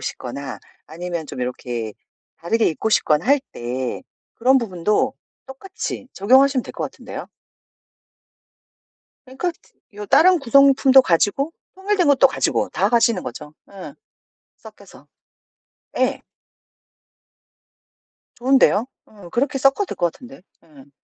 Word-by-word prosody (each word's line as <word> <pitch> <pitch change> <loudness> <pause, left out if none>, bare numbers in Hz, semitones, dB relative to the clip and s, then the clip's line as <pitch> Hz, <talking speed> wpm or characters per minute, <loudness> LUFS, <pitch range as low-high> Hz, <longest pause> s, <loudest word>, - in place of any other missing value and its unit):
싶거나 - - -6 0.3
아니면 170 -1 -6
좀 125 - -7
요렇게 120 -3 -4 0.5
다르게 225 +7 0
입고 220 +7 -3
싶거나 155 -5 +2
할 280 +5 +4
때 125 +1 -4 0.3
그런 260 +3 +3
부분도 215 +4 -1 0.3
똑같이 265 -1 -7
적용하시면 260 +5 +3
될 - - -9
것 - - -6
같은데요? - - -9 2.0
그러니까 265 +7 -3 0.4
요 210 0 -8
다른 360 - +5
구성품도 270 0 +5
가지고 210 - +1 0.2
통일된 385 -2 0
것도 275 -1 +5
가지고 - - -1
다 - - 0
가지는 235 -1 +2
거죠. 150 +5 -8 0.2
응. 195 -1 -10 0.6
섞여서. - - -16 0.9
예. - - 0 2.2
좋은데요? 250 -3 +3 0.2
어 205 -5 -15
그렇게 270 - -1
섞어도 275 +10 +2
될 - - -7
것 170 -2 0
같은데? 250 -4 -14 0.2
응. 145 -4 -18
235 Hz, 255 characters per minute, -20 LUFS, 170-270 Hz, 2.2 s, 다른